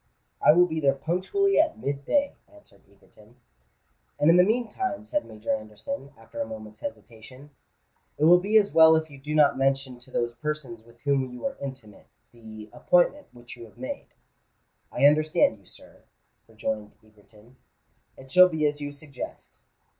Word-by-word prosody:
"I - - +7
will 180 +2 +5
be 160 -2 -3
there 140 -2 +2
punctually 185 - 0
at 315 0 +2
mid 140 -8 -4
day," 285 -1 +1 0.2
answered 305 0 -20
Egerton. 105 +3 -22 0.8
"And 150 +3 +5
in 170 - +5
the 180 - +7
meantime," 240 - -2
said 300 +7 -2
Major 110 +1 -4
Anderson, 110 - -6
after 115 - -9
a - - -3
moment's 110 -1 -10
hesitation, 115 +6 -10 0.7
"it 150 - -2
will 175 +3 +7
be 205 +4 +2
as 205 -2 +3
well 160 0 +7
if 160 -1 -2
you 140 - -13
do 150 +3 -5
not 145 -3 +4
mention 135 -2 0
to 120 - -16
those 120 0 -2
persons 130 -2 -5
with 115 +1 -22
whom 140 -2 0
you 125 +5 -9
are 185 - -2
intimate, 130 -7 -9 0.2
the 110 -2 -12
appointment 180 +12 +1
which 120 -1 -13
you 120 -1 -11
have 110 - -19
made." 275 +2 -7 0.8
"I - - +2
understand 155 -5 +3
you, 100 - -25
sir," - - -16 0.5
rejoined 110 -1 -5
Egerton: 105 +3 -22 0.6
"it 135 0 -14
shall 185 +4 +7
be 160 -3 -1
as 145 0 -1
you 145 0 -5
suggest." 145 -2 -10
140 Hz, 170 wpm, -26 LUFS, 115-175 Hz, 0.8 s, I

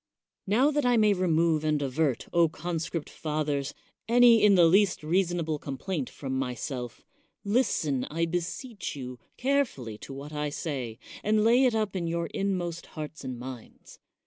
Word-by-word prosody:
Now 250 +9 +4
that 295 0 0
I 245 -1 +3
may 215 -2 +5
remove 165 -4 +2
and 155 -1 +1
avert, 140 -1 0 0.3
con 170 +1 -3
script 160 -1 -4
fathers, 150 -2 -2 0.3
any 235 -1 +6
in 205 -2 +7
the 175 -2 +7
least 190 0 +3
reasonable 170 -2 0
com, 140 -2 -5
plaint 165 -8 -3
from 130 -2 -4
myself, 125 -1 -4 0.4
listen, 175 - +1
I 165 +2 -1
beseech 180 - -4
you, 125 -2 -7 0.2
carefully 240 - -1
to - - -9
what 140 +3 -8
I 150 0 -1
say, 135 -7 -4 0.3
and 215 0 +3
lay 240 +4 +5
it 245 -3 +2
up 215 -3 -1
in 170 -3 -1
your 170 0 -1
inmost 180 -4 -2
hearts 155 0 -6
and 130 -1 -5
minds. 125 -1 -10
165 Hz, 160 wpm, -28 LUFS, 140-200 Hz, 0.4 s, in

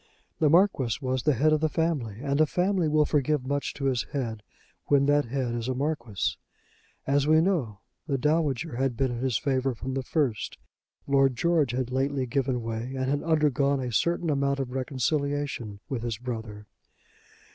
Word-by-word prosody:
The 155 - +4
Marquis 160 - +3
was 130 -2 -1
the 150 +2 +2
head 155 +6 +3
of 155 - +3
the 155 - +2
family, 140 -10 -1
and 140 +1 +1
a 155 - +5
family 180 +1 +1
will 150 0 +3
forgive 145 -2 +1
much 140 +1 -1
to 140 - -4
its 130 -3 +2
head 115 -6 -3 0.5
when 140 -1 +4
that 145 0 +3
head 125 0 -2
is 120 0 -3
a 130 - -1
Marquis. 125 -8 -2 0.7
As 140 +1 +2
we 155 +1 +6
know 155 - 0 0.3
the 140 -3 0
Dowager 150 -1 0
had 130 -3 0
been 135 -2 +1
in 120 - -4
his 130 -4 +1
favour 135 -1 0
from 130 +3 -5
the 135 - -1
first, 130 -5 -1 0.5
Lord 135 -2 +3
George 155 -2 +2
had 125 -1 -2
lately 135 +1 0
given 130 -1 -1
way 115 +3 -4
and 130 +1 -1
had 145 - 0
undergone 145 -4 +2
a 125 -2 -3
certain 170 +4 +1
amount 140 -1 0
of 130 -2 -3
reconciliation 135 -4 -2
with 135 -6 -3
his 115 -3 -3
brother. 110 -3 -6
135 Hz, 180 wpm, -27 LUFS, 125-150 Hz, 0.7 s, we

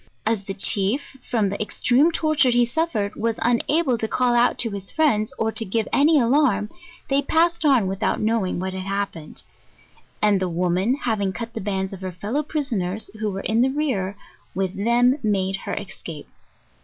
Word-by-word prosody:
As 215 -3 0
the 195 - -5
chief, 205 +8 +1
from 220 -5 +1
the 200 - -4
extreme 255 +8 +2
torture 310 -5 +2
he 240 0 +4
suffered, 235 -7 -1
was 230 0 -1
una 245 +7 +2
ble 250 -7 0
to 220 - -1
call 250 +1 +1
out 240 +1 +3
to 230 - -1
his 195 -1 -6
friends, 250 -10 +1
or 225 0 0
to 225 - +2
give 220 +1 -1
any 300 +2 +5
alarm, 235 -5 +2 0.4
they 275 +1 +2
pas 330 +3 +2
sed 340 -2 -3
on 265 -8 +4
without 190 +1 -1
knowing 215 -5 0
what 190 +1 -3
had 190 - -4
happened; 195 -5 -5 0.8
and 210 -2 +3
the 185 -1 -1
woman 180 +7 +1
having 220 -8 -1
cut 230 +3 -6
the 225 - -5
bands 190 -1 -2
of 190 - -9
her 185 -1 -4
fellow 205 - -2
prisoners, 225 - -3
who 215 -1 -1
were 195 -1 -4
in 225 +3 +1
the 260 - +3
rear, 245 -10 -2 0.4
with 190 -1 -1
them 240 +6 +2
made 195 -4 0
her - - -5
escape. 165 -6 -7
220 Hz, 190 wpm, -23 LUFS, 195-255 Hz, 0.8 s, any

